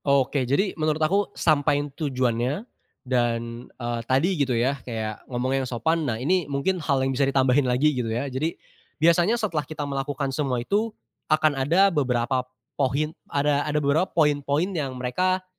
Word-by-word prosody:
Oke, 135 -2 +2
jadi 190 +9 +1
menurut 155 0 +1
aku 190 +6 +1
sampaiin 145 -2 +2
tujuannya 130 - -1 0.4
dan, 120 -1 -1
eee, 120 -1 -4
tadi 135 +7 +3
gitu 135 -7 0
ya 135 +4 0
kayak 110 -3 -5
ngomong 130 +2 0
yang 130 - -3
sopan 160 +5 0
nah 110 - -1
ini 155 +5 0
mungkin 155 +6 -1
hal 140 -3 +1
yang 135 - 0
bisa 135 +1 +2
ditambahin 130 0 +3
lagi 140 +5 +3
gitu 125 -3 -2
ya. 120 +5 -1
Jadi, 140 +5 -2 0.4
biasanya 170 +8 +4
setelah 200 -10 -1
kita 150 +1 -6
melakukan 140 0 -3
semua 135 -3 -1
itu, 205 - 0 0.4
akan 155 -1 +3
ada 170 +9 +3
beberapa 130 -3 +1 0.3
pohin 145 +3 0 0.2
ada 145 0 +1
ada 150 0 -1
beberapa 150 +5 +2
poin-poin 150 +3 +1
yang 140 -6 -3
mereka, 185 +10 0
140 Hz, 160 wpm, -25 LUFS, 130-155 Hz, 0.4 s, biasanya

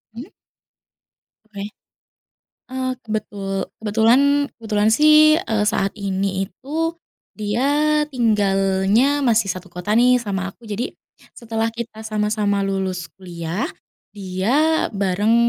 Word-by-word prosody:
Mhm. 255 +10 -8 1.2
Oke, 205 -2 -8 1.1
eee, 260 0 -2
kebetul 205 -3 -3 0.2
kebetulan 225 +4 +4 0.4
kebetulan 215 -2 +1
sih, 305 +2 +6
eee, 215 -2 0
saat 200 -2 +1
ini 195 -1 -1
itu, 315 - -3 0.4
dia 285 +8 +1
tinggalnya 205 +1 +2
masih 230 -5 +3
1 185 +1 -5
kota 180 +4 -2
nih 250 +1 +5
sama 195 -3 -3
aku - - -35
jadi, 215 +4 -4 0.4
setelah 225 -1 -2
kita 230 -1 -7
sama-sama 210 -1 0
lulus 190 -4 -2
kuliah 170 0 -4 0.5
dia 215 +12 +1
bareng, 200 +3 +1
215 Hz, 105 wpm, -21 LUFS, 195-240 Hz, 1.2 s, sih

